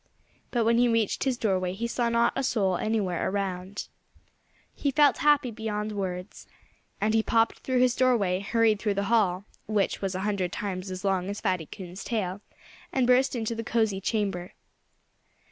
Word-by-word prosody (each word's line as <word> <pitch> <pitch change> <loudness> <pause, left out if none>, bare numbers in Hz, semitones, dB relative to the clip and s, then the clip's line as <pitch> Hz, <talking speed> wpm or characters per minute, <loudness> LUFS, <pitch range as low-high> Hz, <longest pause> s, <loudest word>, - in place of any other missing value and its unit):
But 235 -3 0
when 230 +1 +4
he 245 - +5
reached 230 0 +1
his 260 -2 +1
doorway 185 -5 0
he 225 +5 -3
saw 235 0 0
not 235 0 +2
a 270 - 0
soul 200 -8 +1
anywhere 205 -5 -1
around. 190 0 -3 0.9
He 285 - -1
felt 290 +1 +4
happy 295 -4 +3
beyond 215 -1 -3
words. 185 -2 -5 0.5
And 215 +2 +1
he 225 - +4
popped 225 0 +1
through 255 -1 0
his 250 -1 +3
doorway, 220 -8 +2
hurried 220 +1 +2
through 210 -2 0
the 200 - 0
hall 195 -4 +2 0.2
which 210 -2 0
was 195 -1 -2
a 185 - -2
hundred 195 -3 -1
times 190 -2 -4
as 185 +1 -6
long 190 -1 0
as 205 - -4
Fatty 180 -4 -1
Coon's 185 -1 -8
tail 200 -4 -2 0.5
and 260 -2 +2
burst 255 +2 +3
into 230 -1 -2
the 230 0 -4
cozy 220 -4 0
chamber. 195 -4 -2
210 Hz, 175 wpm, -27 LUFS, 190-235 Hz, 0.9 s, he